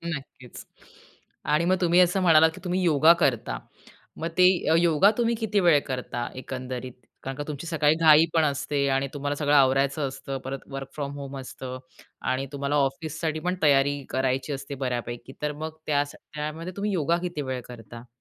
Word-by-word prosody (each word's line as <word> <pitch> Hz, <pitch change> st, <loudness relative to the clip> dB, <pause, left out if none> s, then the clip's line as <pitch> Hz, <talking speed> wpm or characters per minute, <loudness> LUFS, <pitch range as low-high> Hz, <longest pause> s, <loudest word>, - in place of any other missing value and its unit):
.नक्कीच 135 Hz, -2 st, -11 dB, 0.9 s
आणि 165 Hz, +3 st, +2 dB
मग 185 Hz, -, +3 dB
तुम्ही 175 Hz, +1 st, +4 dB
असं 180 Hz, +2 st, +3 dB
म्हणालात, 160 Hz, -2 st, +6 dB
की 185 Hz, -, -12 dB
तुम्ही 180 Hz, 0 st, -1 dB
योगा 160 Hz, 0 st, +6 dB
करता. 120 Hz, -7 st, +1 dB, 0.6 s
मग 165 Hz, -, -3 dB
ते 180 Hz, -, +6 dB, 0.3 s
य -, -, +5 dB
योगा 170 Hz, +4 st, +5 dB
तुम्ही 235 Hz, 0 st, +1 dB
किती 210 Hz, -2 st, +1 dB
वेळ 170 Hz, -5 st, +5 dB
करता 125 Hz, -2 st, -4 dB
एकंदरीत? 130 Hz, -1 st, -6 dB, 0.3 s
कारण 135 Hz, 0 st, -5 dB
का 145 Hz, -, -3 dB
तुमची 150 Hz, +2 st, -6 dB
सकाळी 155 Hz, -2 st, +2 dB
घाईपण 160 Hz, 0 st, +5 dB
असते 140 Hz, 0 st, -1 dB
आणि 135 Hz, +1 st, +1 dB
तुम्हाला 145 Hz, 0 st, -2 dB
सगळं 145 Hz, 0 st, 0 dB
आवरायचं 135 Hz, +1 st, +3 dB
असतं. 135 Hz, 0 st, -6 dB
परत 135 Hz, 0 st, -4 dB
वर्क 135 Hz, 0 st, -6 dB
फ्रॉम 140 Hz, -2 st, -4 dB
होम 140 Hz, -1 st, -7 dB
असतं 130 Hz, 0 st, -7 dB, 0.5 s
आणि 135 Hz, +1 st, -2 dB
तुम्हाला 140 Hz, +1 st, -1 dB
ऑफिससाठी 155 Hz, +3 st, -1 dB
पण 180 Hz, -, +1 dB
तयारी 140 Hz, -1 st, +3 dB
करायची 130 Hz, +2 st, -1 dB
असते 140 Hz, +1 st, -6 dB
बऱ्यापैकी. 120 Hz, +1 st, -4 dB
तर 150 Hz, 0 st, -1 dB
मग 160 Hz, 0 st, -6 dB
त्या 145 Hz, -1 st, +2 dB
त्यामध्ये 155 Hz, +4 st, -7 dB
तुम्ही 205 Hz, +1 st, -1 dB
योगा 170 Hz, 0 st, +1 dB
किती 175 Hz, -4 st, -3 dB
वेळ 125 Hz, -1 st, -3 dB
करता? 115 Hz, 0 st, -11 dB
145 Hz, 170 wpm, -26 LUFS, 135-160 Hz, 0.9 s, म्हणालात